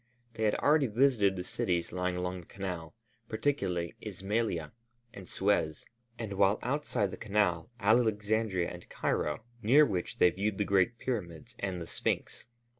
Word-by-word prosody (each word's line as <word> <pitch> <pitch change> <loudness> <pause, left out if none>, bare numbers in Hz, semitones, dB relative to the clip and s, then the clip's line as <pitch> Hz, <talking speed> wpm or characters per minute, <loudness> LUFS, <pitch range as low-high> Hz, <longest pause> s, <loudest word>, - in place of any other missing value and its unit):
They 110 - -1
had 105 - +3
already 145 -2 +3
visited 110 -4 +3
the 90 - -4
cities 85 -1 -1
lying 90 0 -1
along 90 0 -3
the 85 - -19
Canal, 90 -3 -5 0.3
particularly 110 - -1
Ismailia 95 -6 -2 0.4
and 95 -2 -10
Suez, 95 -6 0 0.3
and 110 -4 -4
while 100 +1 +3
outside 125 -7 0
the - - -7
Canal, 100 -6 +1
Alexandria 110 -3 +2
and 90 0 -10
Cairo, 75 +8 -1 0.2
near 135 +7 +6
which 90 -7 -3
they 90 - +5
viewed 100 +3 -1
the 105 - +1
great 100 +5 +2
pyramids 90 -12 -4
and 95 -2 -2
the 85 - -5
Sphinx. - - -3
100 Hz, 150 wpm, -31 LUFS, 90-110 Hz, 0.4 s, near